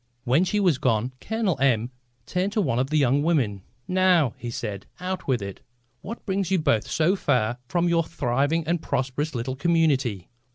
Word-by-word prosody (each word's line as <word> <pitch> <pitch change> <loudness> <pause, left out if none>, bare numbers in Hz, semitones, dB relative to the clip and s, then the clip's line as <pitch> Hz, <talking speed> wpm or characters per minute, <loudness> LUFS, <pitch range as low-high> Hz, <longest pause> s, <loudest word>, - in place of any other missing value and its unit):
When 135 +7 +3
she 205 +3 0
was 175 -9 +2
gone 120 0 +1
Colonel 220 - -1
M 120 -3 +2 0.3
turned 185 +3 -1
to 215 - +2
one 130 -9 0
of 130 +1 0
the 155 - +1
young 140 0 +3
women. 135 - +1 0.3
"Now," 180 -8 +3
he 120 - -6
said, 105 -4 -5
"out 185 +1 -4
with 125 -6 +1
it. 100 -1 -7 0.4
What 230 - -8
brings 195 -2 -1
you 190 - +3
both 140 -10 +1
so 165 +5 +2
far 125 - 0
from 175 +5 +1
your 170 -1 +3
thriving 145 +1 0
and 170 0 0
prosperous 135 +3 -2
little 125 +2 -3
community?" 140 - +1
145 Hz, 180 wpm, -25 LUFS, 125-175 Hz, 0.4 s, When